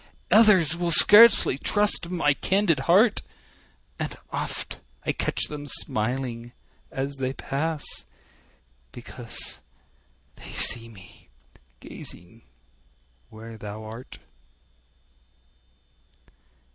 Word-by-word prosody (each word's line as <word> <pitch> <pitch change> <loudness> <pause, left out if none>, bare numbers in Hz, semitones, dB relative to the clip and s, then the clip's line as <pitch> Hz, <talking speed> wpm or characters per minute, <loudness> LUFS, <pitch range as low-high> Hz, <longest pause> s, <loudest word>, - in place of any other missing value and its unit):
Others 195 -8 +5
will 175 0 -2
scarcely 205 - +7
trust 205 -3 0
my 165 -5 +1
candid 190 -1 0
heart; 205 +6 +4 0.8
And - - -5
oft - - -5 0.3
I - - 0
catch - - -2
them 145 -1 -6
smiling 120 0 -3 0.4
as 135 +1 -5
they 130 0 -3
pass, 150 +3 -4 1.1
Because - - -4 0.8
they - - -11
see 115 0 +1
me 95 -4 -17 0.5
gazing 90 +7 -9 0.9
where 110 0 -12
thou 105 +1 -8
art. 115 +4 -11
140 Hz, 85 wpm, -24 LUFS, 115-175 Hz, 1.1 s, scarcely